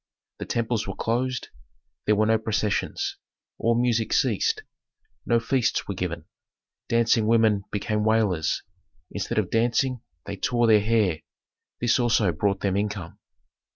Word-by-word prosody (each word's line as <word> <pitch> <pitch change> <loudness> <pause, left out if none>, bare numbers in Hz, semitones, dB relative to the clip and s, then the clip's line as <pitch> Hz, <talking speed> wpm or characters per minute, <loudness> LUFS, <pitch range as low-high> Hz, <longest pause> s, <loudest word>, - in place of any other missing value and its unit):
The - - -4
temples 115 -2 -1
were 95 - -4
closed; 125 +2 -2 0.6
there 105 - +4
were 110 +1 +2
no 110 0 +3
processions. 110 -1 -1 0.4
All 115 +1 +2
music 115 -2 +1
ceased; 450 -1 +1 0.6
no 120 -1 +3
feasts 120 +1 0
were 100 - -2
given. 85 -3 -4 0.6
Dancing 115 -2 +3
women 110 -3 +3
became 105 +1 -1
wailers; 105 -7 +1 0.5
instead - - -3
of - - 0
dancing 120 +2 +1 0.2
they 100 0 -6
tore 120 +3 +1
their 110 -2 +5
hair; 105 -6 +1 0.6
this 120 +1 +3
also 115 -5 +3
brought 100 +5 -1
them 95 -2 0
income. 100 -4 -3
110 Hz, 135 wpm, -25 LUFS, 100-115 Hz, 0.6 s, their